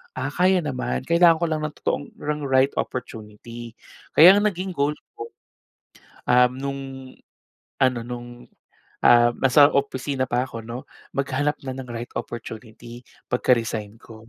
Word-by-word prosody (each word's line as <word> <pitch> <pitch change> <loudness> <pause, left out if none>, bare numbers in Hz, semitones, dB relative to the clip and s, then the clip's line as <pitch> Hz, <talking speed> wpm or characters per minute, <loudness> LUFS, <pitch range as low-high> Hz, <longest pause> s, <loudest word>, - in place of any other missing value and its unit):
"Ah, - - -3
kaya 185 0 +2
naman. 130 -4 -3
Kailangan 170 +3 +5
ko 165 +1 -1
lang 155 - 0
ng 155 -1 -4
totoong 145 - -1
ng 150 0 -4
right 135 +1 +3
opportunity." 115 0 -7 0.4
Kaya 185 +6 +9
ang 210 - +2
naging 190 -1 -3
goal 150 -3 0 0.2
ko, 445 +2 -8 0.9
um, 125 0 +5
nung 140 0 -3 1.0
ano 130 -2 +3
nung, 120 0 -9 0.6
ah, 120 0 +6
nasa 140 +2 +5
opisina 135 -1 -1
pa 125 +1 0
ako 115 -3 -8
'no, 120 +3 -8 0.3
maghanap 140 +2 0
na 130 - -4
ng 130 -1 -8
right 120 0 -7
opportunity 115 +1 -8 0.3
pagka-resign 115 -4 0
ko. 110 -1 -15
130 Hz, 140 wpm, -23 LUFS, 120-150 Hz, 1.0 s, Kaya